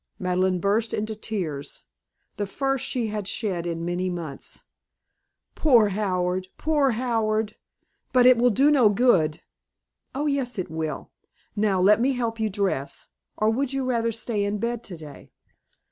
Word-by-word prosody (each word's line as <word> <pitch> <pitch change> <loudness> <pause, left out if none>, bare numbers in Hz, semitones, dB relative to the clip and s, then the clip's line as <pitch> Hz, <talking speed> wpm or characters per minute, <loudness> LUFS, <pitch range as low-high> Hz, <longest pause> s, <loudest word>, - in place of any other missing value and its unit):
Madeleine 185 0 +1
burst 210 +4 +1
into 215 +1 -3
tears, 165 -10 -4 0.5
the 205 - -2
first 270 +5 -1
she 235 -4 -1
had 210 -2 -4
shed 185 -6 -2
in 165 0 -3
many 180 +1 -1
months. 165 -6 -6 0.9
"Poor 240 -9 +4
Howard! 185 -2 -1
Poor 295 -5 +2
Howard! 220 -3 0 0.6
But 250 -1 +5
it 255 0 +8
will 245 +1 +4
do 270 +6 +4
no 255 -7 +5
good." 195 -9 +2 0.7
"Oh, 290 +2 -1
yes, 275 -5 -1
it 185 -4 -4
will. 160 -3 -4 0.4
Now, 205 -3 +1
let 210 +5 +5
me 270 +2 +2
help 230 -2 -2
you 220 -1 +1
dress. 190 -9 -2 0.3
Or 215 +1 +2
would 265 +3 -1
you 270 -1 -1
rather 230 -2 0
stay 225 -2 -2
in 205 +1 -1
bed 235 +2 -2
today?" 160 -8 -10
215 Hz, 150 wpm, -25 LUFS, 185-240 Hz, 0.9 s, it